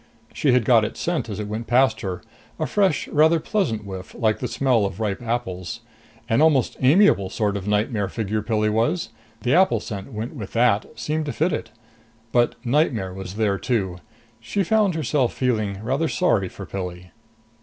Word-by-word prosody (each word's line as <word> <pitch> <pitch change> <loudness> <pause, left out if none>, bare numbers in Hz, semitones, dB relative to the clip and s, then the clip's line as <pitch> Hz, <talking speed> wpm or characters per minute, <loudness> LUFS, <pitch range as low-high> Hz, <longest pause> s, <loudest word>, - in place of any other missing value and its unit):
She 140 - +2
had 125 -3 +3
got 115 -2 +5
its 110 - -4
scent 170 -8 -1
as 105 - -5
it 105 - -4
went 110 +2 -5
past 130 +2 +3
her, 90 -3 -4 0.3
a - - -1
fresh, 195 -6 +1
rather 160 +2 +4
pleasant 120 - -1
whiff, 95 -2 -8
like 110 -3 +1
the 125 - -2
smell 125 -5 +2
of 100 0 -3
ripe 105 +1 -2
apples. 115 -3 -3 0.5
An 115 +2 +2
almost 155 -5 +3
amiable 135 - +4
sort 105 0 -1
of 100 0 -4
nightmare 105 0 0
figure, 110 +1 -2
Pilli 110 0 0
was; 115 +9 0 0.3
the 125 +2 +2
apple 175 - +4
smell 100 -2 -6
went 110 +5 -5
with 110 -10 -8
that, 115 -3 +3
seemed 155 0 -2
to - - -1
fit 165 +2 +1
it. - - -3 0.6
But 120 -1 +2
nightmare 120 - +1
was 95 0 -7
there 105 -3 +1
too. 95 -6 -1 0.4
She 200 - -1
found 205 -1 +2
herself 145 -4 0
feeling 110 -6 0
rather 135 +7 0
sorry 110 - +1
for 100 - -9
Pilli. 90 -2 -6
115 Hz, 180 wpm, -23 LUFS, 100-140 Hz, 0.6 s, got